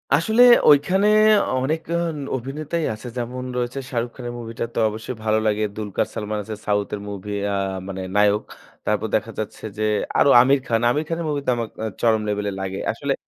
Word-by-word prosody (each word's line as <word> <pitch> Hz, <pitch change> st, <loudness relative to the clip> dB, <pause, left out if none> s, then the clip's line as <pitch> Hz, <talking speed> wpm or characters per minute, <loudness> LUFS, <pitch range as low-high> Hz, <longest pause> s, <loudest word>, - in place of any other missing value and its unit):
আসলে 220 Hz, +8 st, +2 dB, 0.3 s
ঐখানে 180 Hz, +8 st, +4 dB, 0.6 s
অনেক 155 Hz, +4 st, 0 dB, 0.2 s
আ -, -, 0 dB, 0.4 s
অভিনেতাই 150 Hz, +6 st, -3 dB
আছে। 110 Hz, +3 st, -9 dB
যেমন 125 Hz, +1 st, -4 dB
রয়েছে 125 Hz, +2 st, -2 dB
'শাহরুখ 120 Hz, -2 st, -2 dB
খান' 125 Hz, -2 st, -7 dB
এর 120 Hz, -, -6 dB
movie 115 Hz, -1 st, -8 dB
টা -, -, 0 dB
তো -, -, 0 dB
অবশ্যই 110 Hz, +4 st, -6 dB
ভালো 110 Hz, 0 st, +2 dB
লাগে। 105 Hz, 0 st, +1 dB
'দুলকার 105 Hz, -3 st, -2 dB
সালমান' 105 Hz, 0 st, -3 dB
আছে 110 Hz, +1 st, -6 dB
সাউথ 105 Hz, -1 st, +1 dB
এর 100 Hz, -, -8 dB
movie 100 Hz, +1 st, -5 dB, 0.2 s
আ -, -, 0 dB, 0.3 s
মানে 95 Hz, -1 st, -5 dB
নায়ক। 105 Hz, 0 st, +3 dB, 0.4 s
তারপর 105 Hz, +1 st, 0 dB
দেখা 110 Hz, +1 st, -1 dB
যাচ্ছে 110 Hz, -, -6 dB
যে 110 Hz, -, -1 dB, 0.4 s
আরো -, -, +5 dB
'আমির 135 Hz, +3 st, +5 dB
খান'। 115 Hz, 0 st, +1 dB
'আমির 150 Hz, +6 st, 0 dB
খান' 165 Hz, 0 st, -2 dB
এর -, -, -3 dB
movie 145 Hz, -2 st, -2 dB
তো -, -, +4 dB
আমাক 115 Hz, -2 st, -3 dB
আ -, -, -1 dB, 0.2 s
চরম 110 Hz, -2 st, +3 dB
level 105 Hz, 0 st, -1 dB
এ -, -, -6 dB
লাগে। 95 Hz, 0 st, -4 dB
আসলে -, -, -2 dB
115 Hz, 205 wpm, -22 LUFS, 105-135 Hz, 0.6 s, আরো